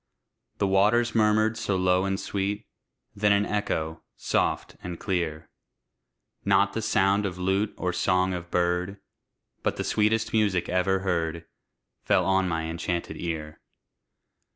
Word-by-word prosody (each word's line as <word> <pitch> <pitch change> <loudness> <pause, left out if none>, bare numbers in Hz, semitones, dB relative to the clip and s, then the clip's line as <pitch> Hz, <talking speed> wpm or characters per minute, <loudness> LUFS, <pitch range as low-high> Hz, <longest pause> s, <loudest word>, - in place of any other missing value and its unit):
The 100 - +1
waters 105 +5 +3
murmured 110 0 +3
so 100 -3 -1
low 90 0 +2
and 95 0 -1
sweet, 100 +2 -2 0.5
Then 105 0 +2
an 100 0 +3
echo, 80 -7 -2 0.2
soft - - -1
and 90 -2 -6
clear, 80 -4 -2 1.0
Not - - +3
the - - -2
sound 100 +2 +2
of 95 -3 -3
lute 95 +3 0
or 90 -1 -1
song 90 +2 +1
of 85 -1 -6
bird, 90 +3 0 0.6
But - - -1
the - - -1
sweetest 110 +1 +1
music 105 -5 +2
ever 95 +1 +1
heard, 85 -3 -1 0.6
Fell - - +2
on 95 -1 +2
my 80 -1 -1
enchanted 85 +1 -3
ear. 80 -3 -5
95 Hz, 135 wpm, -26 LUFS, 85-105 Hz, 1.0 s, waters